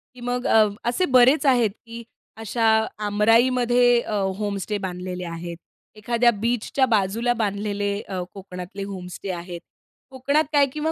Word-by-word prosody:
की 250 - -14
मग 245 +1 -3
अ, 220 -1 +5 0.2
असे 245 +10 +1
बरेच 260 +4 +4
आहेत 240 -6 +3
की 230 0 -9 0.3
अशा 225 +1 -3 0.4
आमराईमध्ये 240 +3 +3
अ, 215 - -6 0.2
होमस्टे 205 0 -3
बांधलेले 180 -1 -5
आहेत. 170 0 -6 0.4
एखाद्या 235 +2 +2
बीचच्या 235 +4 0
बाजूला 225 +2 +1
बांधलेले 205 0 -2
अ, 185 -2 -5
कोकणातले 190 0 -8
होमस्टे 190 -1 -6
आहेत. 175 -1 -7 0.5
कोकणात 280 +4 +1
काय? 285 -1 +5
किंवा 305 +1 -1
220 Hz, 130 wpm, -23 LUFS, 195-245 Hz, 0.5 s, अ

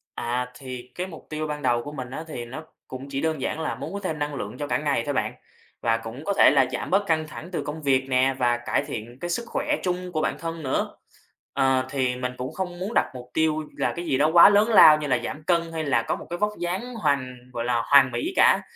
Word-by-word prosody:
À, 125 +1 -2
thì 125 -2 -8
cái 185 +1 -3
mục 160 - -12
tiêu 155 0 -3
ban 150 -1 -4
đầu 120 -3 +2
của 145 - -7
mình 130 -4 -6
á, 155 - -5
thì 120 -6 -6
nó 135 +7 -8 0.2
cũng 130 +2 -8
chỉ 135 0 -3
đơn 160 -4 -1
giản 155 - -2
là 160 - -2
muốn - - -7
có 200 - -3
thêm 160 -6 -3
năng 145 -1 -2
lượng 105 0 -5
cho 145 - -4
cả - - +1
ngày 145 -6 0
thôi 145 - -1
bạn. - - -1 0.5
Và 115 -1 +2
cũng 115 +6 -8
có 200 - +1
thể - - +6
là 130 - +4
giảm 125 - -4
bớt 200 +2 +2
căng 155 -2 0
thẳng 170 +3 -9
từ 175 - -2
công 150 +2 -6
việc 135 -1 +1
nè, 130 +1 +3
và 120 -1 +2
cải 120 - -1
thiện 120 +3 -6
cái 175 - -4
sức 235 +7 -1
khỏe 295 +4 -1
chung 180 0 -2
của 155 -2 -1
bản - - 0
thân 165 -1 -5
nữa. 130 - -2 0.6
À, 130 -1 +2
thì 130 -2 0
mình 125 0 -3
cũng 130 +1 -5
không 180 -2 -4
muốn 200 +5 -4
đặt - - +2
mục 125 0 -9
tiêu 155 -1 +1
là - - 0
cái 170 0 -5
gì 135 - +1
đó 150 +2 +3
quá 175 +3 +10
lớn 210 +3 +4
lao 155 -8 +9
như 150 - -3
là 125 -3 +2
giảm 150 +5 -5
cân 170 -1 +1
hay 160 -1 -2
là 135 -5 +2
có - - -1
một - - -10
cái 175 - -3
vóc 210 +1 +1
dáng 190 +8 -3
hoàn 140 - 0 0.2
gọi 115 0 -3
là 120 -1 +1
hoàn 135 -2 +6
mỹ 120 - -2
cả, - - +5
145 Hz, 270 wpm, -25 LUFS, 130-170 Hz, 0.6 s, quá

